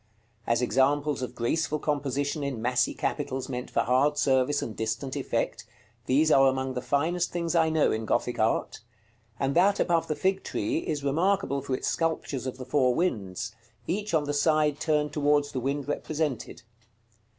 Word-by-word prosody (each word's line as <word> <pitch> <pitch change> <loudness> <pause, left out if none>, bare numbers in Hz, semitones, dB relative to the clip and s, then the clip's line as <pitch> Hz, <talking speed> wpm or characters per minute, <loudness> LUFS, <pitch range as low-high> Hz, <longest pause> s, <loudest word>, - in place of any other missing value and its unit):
As 115 +1 +2
examples 140 +2 +2
of 125 - -5
graceful 155 +6 0
composition 145 0 -1
in 140 -4 -3
massy 125 +2 +1
capitals 130 0 -2
meant 125 0 -4
for - - +1
hard 135 +4 +2
service 135 0 +2
and 110 - -6
distant 110 +5 -3
effect, - - -2 0.4
these 155 +4 +3
are 135 -1 +6
among 130 0 0
the 125 - -3
finest 170 +7 0
things 170 -1 -2
I 165 -2 +3
know 160 -1 +2
in 110 0 -2
Gothic - - -1
art; - - 0 0.6
and 135 0 0
that 195 +4 +4
above 170 -2 +2
the 155 - -1
fig 190 +3 0
tree 320 0 -1
is 150 - -3
remarkable 160 0 +1
for 135 -1 -2
its - - -4
sculptures 160 -5 -1
of 130 - -5
the 130 - -7
four 130 -2 +2
winds; 115 - -2 0.3
each 205 - -1
on 155 - +2
the 145 0 -2
side 150 0 +2
turned 150 -2 0
towards 145 -1 +2
the 130 - -2
wind 140 +2 -2
represented. 145 -5 -3
145 Hz, 175 wpm, -27 LUFS, 130-160 Hz, 0.6 s, are